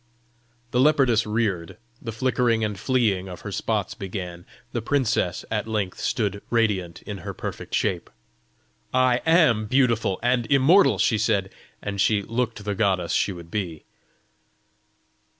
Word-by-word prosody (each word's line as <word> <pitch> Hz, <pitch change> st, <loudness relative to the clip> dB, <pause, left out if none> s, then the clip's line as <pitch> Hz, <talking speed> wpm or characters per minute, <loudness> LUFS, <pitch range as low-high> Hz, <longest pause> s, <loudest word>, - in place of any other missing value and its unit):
The 125 Hz, -, +1 dB
leopardess 130 Hz, -6 st, +4 dB
reared; 105 Hz, -6 st, -1 dB, 0.2 s
the 115 Hz, -, -5 dB
flickering 120 Hz, -1 st, +1 dB
and 105 Hz, -1 st, -1 dB
fleeing 105 Hz, -8 st, +1 dB
of 90 Hz, -, -9 dB
her -, -, -6 dB
spots -, -, -1 dB
began; 90 Hz, -3 st, -6 dB, 0.2 s
the 120 Hz, -, -2 dB
princess 120 Hz, -8 st, 0 dB
at 110 Hz, 0 st, -1 dB
length 105 Hz, -4 st, -2 dB
stood 100 Hz, -3 st, -1 dB
radiant 105 Hz, -7 st, 0 dB
in 100 Hz, -2 st, -6 dB
her -, -, -7 dB
perfect -, -, -5 dB
shape. -, -, -1 dB, 0.9 s
"I 130 Hz, -1 st, +3 dB
AM 150 Hz, -11 st, +4 dB
beautiful 115 Hz, -6 st, +2 dB
and 120 Hz, -1 st, +1 dB
immortal!" 140 Hz, -, +5 dB
she 110 Hz, +3 st, +2 dB
said 100 Hz, -3 st, +1 dB, 0.3 s
and 100 Hz, -1 st, -2 dB
she 105 Hz, -1 st, +2 dB
looked 115 Hz, -1 st, -3 dB
the 105 Hz, -, -1 dB
goddess 95 Hz, -5 st, 0 dB
she -, -, +1 dB
would 85 Hz, -2 st, -10 dB
be. 90 Hz, -7 st, -4 dB
110 Hz, 140 wpm, -24 LUFS, 95-125 Hz, 0.9 s, immortal